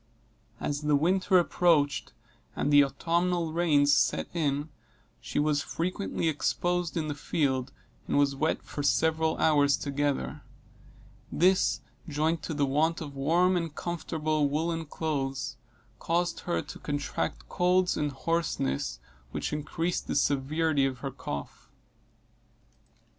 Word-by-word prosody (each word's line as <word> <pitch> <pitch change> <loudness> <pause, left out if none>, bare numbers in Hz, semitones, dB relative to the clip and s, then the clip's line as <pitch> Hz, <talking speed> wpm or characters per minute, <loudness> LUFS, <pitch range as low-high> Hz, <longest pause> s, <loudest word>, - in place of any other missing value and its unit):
As 145 0 -2
the 150 -1 +2
winter 185 +5 +3
approached, 165 -4 +2 0.4
and 145 - 0
the 145 0 +8
autumnal 170 +3 0
rains 145 -4 +4
set - - +2
in, 145 -2 -1 0.5
she - - -6
was 145 0 +2
frequently 180 +1 -2
exposed 175 +3 0
in 155 -2 -1
the 150 - -2
field, 140 -3 -1 0.4
and - - +1
was 140 -1 +3
wet 155 +4 0
for 145 - -5
several 160 +2 +2
hours 145 -2 +4
together; 145 0 -2 0.9
this, 175 -8 +3 0.3
joined 155 +2 0
to 160 - -4
the 145 -1 +2
want 155 +5 +1
of 145 -3 -7
warm 170 +7 +3
and 165 -3 -2
comfortable 155 -3 -1
woollen 165 +2 -1
clothes, 135 -5 -3 0.4
caused 175 +1 0
her 175 - -1
to - - -10
contract 145 -1 -3
colds, 180 +1 +2
and 150 -1 -1
hoarseness, 100 - -1 0.3
which - - -3
increased 165 +3 -2
the - - -2
severity 145 +2 +1
of 135 -1 0
her 135 - -2
cough. 70 - -7
155 Hz, 125 wpm, -28 LUFS, 145-170 Hz, 0.9 s, the